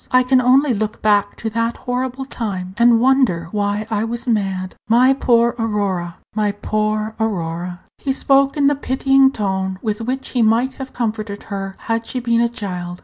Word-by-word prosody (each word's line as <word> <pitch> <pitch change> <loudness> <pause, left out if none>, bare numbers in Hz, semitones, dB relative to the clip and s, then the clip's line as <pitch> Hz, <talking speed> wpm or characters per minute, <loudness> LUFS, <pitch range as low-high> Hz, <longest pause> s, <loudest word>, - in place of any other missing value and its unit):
I 255 -1 +4
can 255 0 +3
only 260 +2 +4
look 215 0 -3
back 205 -1 +2
to 225 - -4
that 230 +1 -1
horrible 255 +1 -3
time, 190 -8 -4
and 235 0 +5
wonder 240 -10 +2
why 205 0 -1
I 210 0 0
was 235 +3 -4
mad." 195 -5 -1 0.2
"My 250 +4 +5
poor 235 -3 +3
Aurora! 200 -6 -2 0.2
my 210 -1 0
poor 215 +1 -1
Aurora!" 175 -4 -3 0.2
He 275 - -1
spoke 275 +1 +2
in 285 - +2
the 285 - +5
pitying 270 0 +3
tone 190 -4 -2
with 215 -1 -2
which 260 +3 -3
he 245 - 0
might 230 +4 +2
have 265 - -6
comforted 215 -3 -3
her 195 -1 -4
had 225 0 -2
she 255 - -3
been 235 -1 +1
a 235 - +2
child. 180 -6 -5
225 Hz, 180 wpm, -19 LUFS, 200-255 Hz, 0.2 s, and